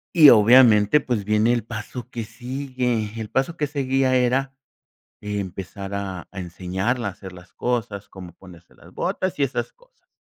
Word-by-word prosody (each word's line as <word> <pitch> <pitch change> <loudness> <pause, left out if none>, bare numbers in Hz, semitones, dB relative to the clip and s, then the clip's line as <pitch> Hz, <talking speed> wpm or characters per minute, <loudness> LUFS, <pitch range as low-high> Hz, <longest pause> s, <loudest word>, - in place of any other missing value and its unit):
Y 155 -4 +9
obviamente, 115 +1 +6
pues, 120 -7 -2
viene 110 +3 +2
el 120 -3 -2
paso 115 +2 -7
que 120 -3 -5
sigue. 125 -1 -3
El 110 -1 -5
paso 135 +6 -1
que 150 - -1
seguía 135 -2 0
era 130 +2 +1 0.7
empezar 100 -1 -5
a 95 -3 -4
a 95 - -9
enseñarle 95 +7 -3
a - - 0
hacer 95 -1 -11
las 90 0 -15
cosas, 110 -5 -3
cómo 90 -2 -11
ponerse 90 -1 -17
las - - -18
botas 185 -4 -2
y - - 0
esas 140 - -2
cosas. - - -29
115 Hz, 165 wpm, -23 LUFS, 100-130 Hz, 0.7 s, Y